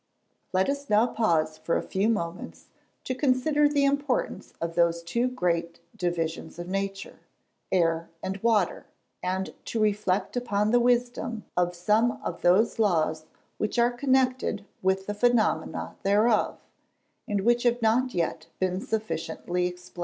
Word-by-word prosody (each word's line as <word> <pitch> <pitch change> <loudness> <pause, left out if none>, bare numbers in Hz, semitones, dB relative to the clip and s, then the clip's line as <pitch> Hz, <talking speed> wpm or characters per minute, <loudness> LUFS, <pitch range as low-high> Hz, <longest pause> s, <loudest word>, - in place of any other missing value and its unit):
Let 185 0 +2
us 280 0 -3
now 215 +2 +5
pause 160 -10 0
for 165 - 0
a - - -3
few 195 +4 0
moments 170 -6 -4 0.3
to 255 - -2
consider 290 +3 +2
the 285 -1 +2
importance 285 - -1
of 170 0 -3
those 170 0 +2
two 235 +9 0
great 170 -8 -1 0.2
divisions 170 -4 -3
of 175 0 -6
nature, 195 +1 -4 0.5
Air 165 -2 +1
and 190 +1 -3
Water, 220 -6 +1 0.3
and 185 +1 -2
to 230 - -3
reflect 210 -2 +1
upon 210 -4 0
the 245 - +5
wisdom 240 -2 0
of 180 0 +1
some 215 +7 +2
of - - -4
those 195 +7 +3
laws 160 -6 +1 0.3
which 210 - -1
are 240 +1 +4
connected 255 -4 +1 0.2
with 190 +1 +1
the 210 - -3
phenomena 235 +1 +1
thereof, 210 +3 +2 0.7
and 205 -1 0
which 240 +3 +3
have 240 0 +2
not 245 +2 +2
yet 165 -2 -1
been 185 0 -1
sufficiently 180 -4 -2
explained. 180 0 -10
205 Hz, 145 wpm, -27 LUFS, 175-240 Hz, 0.7 s, now